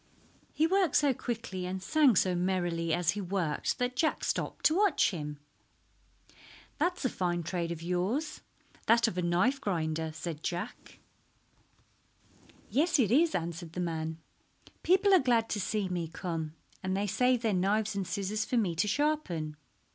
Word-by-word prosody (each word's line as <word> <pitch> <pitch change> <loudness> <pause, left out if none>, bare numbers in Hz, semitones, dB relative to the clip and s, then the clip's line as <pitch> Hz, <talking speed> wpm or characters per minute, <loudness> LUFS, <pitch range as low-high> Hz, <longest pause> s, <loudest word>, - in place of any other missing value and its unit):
He 315 - +2
worked 370 -3 +2
so 285 -2 +4
quickly 225 -7 -4
and 190 +1 -3
sang 295 -5 +4
so 185 0 +3
merrily 175 -2 0
as 175 0 +2
he 205 +2 -4
worked 180 -5 -1
that 250 0 -1
Jack 310 +4 0
stopped - - -2
to 310 - +5
watch 395 - +3
him. 150 -4 -5 1.4
"That 355 +4 +1
is - - -5
a - - +3
fine 175 -4 -1
trade 170 0 -2
of 165 -1 -6
yours—that 230 - -1
of 180 -5 -2
a - - +1
knife 185 +11 +1
grinder," 160 -4 -1
said 160 0 -6
Jack. 180 +9 -5 1.7
"Yes, 320 +4 +3
it 225 -7 +2
is," 315 +6 +4
answered 170 -1 -4
the 180 - -5
man. 160 -2 -2 0.6
"People 385 +3 +4
are 375 - +8
glad 235 -4 +2
to 210 - -1
see 205 0 -1
me 175 -2 -2
come, 160 -2 -4 0.3
and 185 0 -1
they 200 - 0
save 250 +4 +2
their 220 -2 +2
knives 205 +4 +1
and 195 -2 -2
scissors 200 +4 -2
for 250 - -1
me 200 -7 +1
to 190 - +2
sharpen. 205 - -1
190 Hz, 160 wpm, -30 LUFS, 170-250 Hz, 1.7 s, are